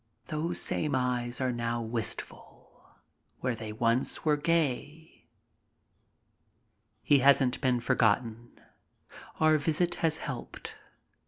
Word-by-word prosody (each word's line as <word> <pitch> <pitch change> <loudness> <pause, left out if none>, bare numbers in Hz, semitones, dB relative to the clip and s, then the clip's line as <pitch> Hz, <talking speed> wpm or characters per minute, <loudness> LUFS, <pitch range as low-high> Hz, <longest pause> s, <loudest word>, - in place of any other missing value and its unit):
Those 160 +2 -1
same 150 -3 +1
eyes 125 -1 -1
are 130 -1 0
now 120 0 -2
wistful, 115 -1 -6 0.4
where 125 -1 0
they 110 -1 -7
once 115 +7 0
were 150 -1 +4
gay. 155 0 -2 1.8
He 145 - +4
hasn't 135 -1 +4
been 130 -3 +2
forgotten. 115 0 0 0.8
Our 155 -1 +4
visit 165 +4 +1
has 160 -1 +2
helped. 130 -6 -7
130 Hz, 100 wpm, -29 LUFS, 120-155 Hz, 1.8 s, were